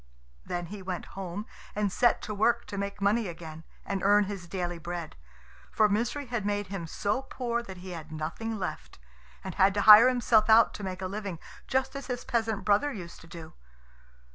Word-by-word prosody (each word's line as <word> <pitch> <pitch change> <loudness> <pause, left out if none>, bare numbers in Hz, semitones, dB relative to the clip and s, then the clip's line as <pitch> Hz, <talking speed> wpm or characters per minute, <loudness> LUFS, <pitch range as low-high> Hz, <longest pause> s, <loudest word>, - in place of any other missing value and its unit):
Then 175 0 -4
he 205 - -7
went 185 -1 -4
home 195 +2 -5 0.3
and 205 -1 0
set 240 +4 +2
to 215 - -4
work 235 +3 +2
to 200 - -7
make 200 0 -4
money 210 +2 +2
again, 165 -2 -8 0.2
and 195 -1 -2
earn 205 +1 +5
his 195 -3 -6
daily 175 -1 -3
bread; 170 0 -6 0.6
for 215 - +4
Misery 230 +7 -1
had 240 -4 -3
made 205 -1 -2
him 190 -4 -5
so 205 +9 -1
poor 240 -3 -3
that 190 -5 -10
he 180 +1 -9
had 160 -2 -8
nothing 165 +9 -4
left, 185 - -6 0.5
and 190 - -5
had 195 0 +3
to 205 - +2
hire 215 +4 +10
himself 230 -3 +3
out 225 +1 +6
to 205 - -8
make 190 0 -5
a - - -1
living, 200 -2 -5 0.3
just 265 +1 0
as 275 - -6
his 245 -2 -4
peasant 225 -3 -1
brother 210 +8 +3
used 180 -8 -9
to 165 - -14
do. 165 -1 -10
200 Hz, 195 wpm, -29 LUFS, 180-225 Hz, 0.6 s, hire